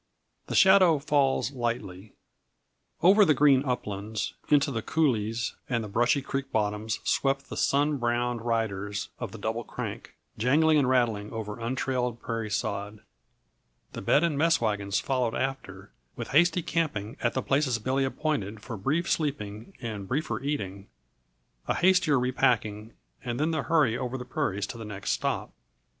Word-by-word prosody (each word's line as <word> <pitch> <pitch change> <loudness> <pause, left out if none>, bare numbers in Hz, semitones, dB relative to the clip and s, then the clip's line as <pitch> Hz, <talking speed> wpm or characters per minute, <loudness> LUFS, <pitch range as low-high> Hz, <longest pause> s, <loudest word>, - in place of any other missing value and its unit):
The - - -3
Shadow 190 -4 +6
Falls 140 -2 +1
Lightly. 115 -6 -4 0.9
Over 200 +4 +7
the 155 -6 +4
green 140 -1 +5
uplands, 110 -5 -3 0.2
into 145 -1 +4
the 115 -3 -2
coulées 115 -7 0 0.2
and 120 -3 0
the - - -5
brushy 120 +6 +2
creek 135 0 -4
bottoms 105 0 -1
swept 135 0 0
the - - -4
sun 145 +1 +2
browned 120 -1 -1
riders 105 -4 -2
of - - -5
the - - -8
Double - - -3
Crank; - - -7 0.2
jangling 150 +6 +4
and 130 -3 +2
rattling 115 -5 +1
over 105 -2 -5
untrailed 125 0 -2
prairie 115 -2 -4
sod, 105 0 -3 0.9
the - - -6
bed - - +3
and 155 -4 0
mess 165 +1 +4
wagons 100 -3 0
followed 125 -4 -1
after 100 -8 -4 0.2
with - - -6
hasty 170 +3 +3
camping 140 -12 -2
at 120 - 0
the 130 - 0
places 135 -3 +1
Billy 130 +4 0
appointed 130 -7 -2
for 115 +1 -7
brief 150 - 0
sleeping 115 -8 -3
and 105 -4 -5
briefer 140 +2 -2
eating, 100 -9 -4 0.8
a - - +1
hastier 180 -5 +4
repacking 115 -4 0 0.3
and 120 -2 -3
then 155 +2 +1
the 155 -3 0
hurry 145 -7 +2
over 125 +1 -3
the 125 - -7
prairies 105 -9 -2
to 115 - -8
the - - -6
next 100 - -4
stop. - - -2
120 Hz, 155 wpm, -27 LUFS, 105-145 Hz, 0.9 s, Over